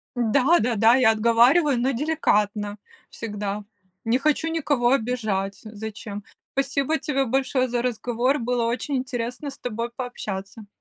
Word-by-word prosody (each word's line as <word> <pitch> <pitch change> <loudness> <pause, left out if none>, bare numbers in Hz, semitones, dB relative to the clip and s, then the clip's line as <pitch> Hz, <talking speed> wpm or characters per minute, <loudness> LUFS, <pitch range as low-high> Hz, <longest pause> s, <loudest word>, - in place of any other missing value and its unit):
Да-да-да, 240 -2 +4
я 250 -4 +5
отговариваю, 240 +7 +4
но 255 +3 +1
деликатно 210 -8 0 0.3
всегда. 210 -2 -4 0.4
Не 230 +2 +3
хочу 305 +3 +1
никого 285 -7 +1
обижать, 220 -6 -1
зачем? 215 -1 -7 0.3
Спасибо 275 +3 0
тебе 275 -3 -1
большое 260 +1 +1
за 240 -1 -1
разговор, 245 +3 0
было 245 0 0
очень 250 +5 -2
интересно 255 +2 -4
с - - -13
тобой 235 0 -4
пообщаться. 210 -4 -6
240 Hz, 120 wpm, -24 LUFS, 220-270 Hz, 0.4 s, я